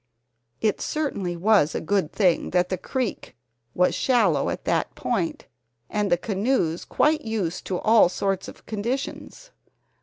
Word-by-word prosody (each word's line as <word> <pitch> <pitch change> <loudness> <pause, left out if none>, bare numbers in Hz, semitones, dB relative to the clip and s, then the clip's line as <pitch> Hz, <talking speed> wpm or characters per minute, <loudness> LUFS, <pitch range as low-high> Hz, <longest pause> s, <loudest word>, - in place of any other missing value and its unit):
It 215 -2 +1
certainly 200 - -2
was 190 -5 +3
a - - 0
good 190 -1 0
thing 185 -5 +2
that 180 0 +1
the 185 - -1
creek 255 +1 -4 0.4
was 180 0 +3
shallow 210 - +2
at - - -5
that - - 0
point 315 -3 -2 0.5
and 210 -1 0
the 175 - +5
canoes 195 -3 0
quite 305 +1 +2
used 205 -7 -3
to 185 - -1
all 220 -3 +5
sorts 195 +1 -2
of - - -12
conditions. 250 - -4
205 Hz, 145 wpm, -24 LUFS, 180-235 Hz, 0.5 s, the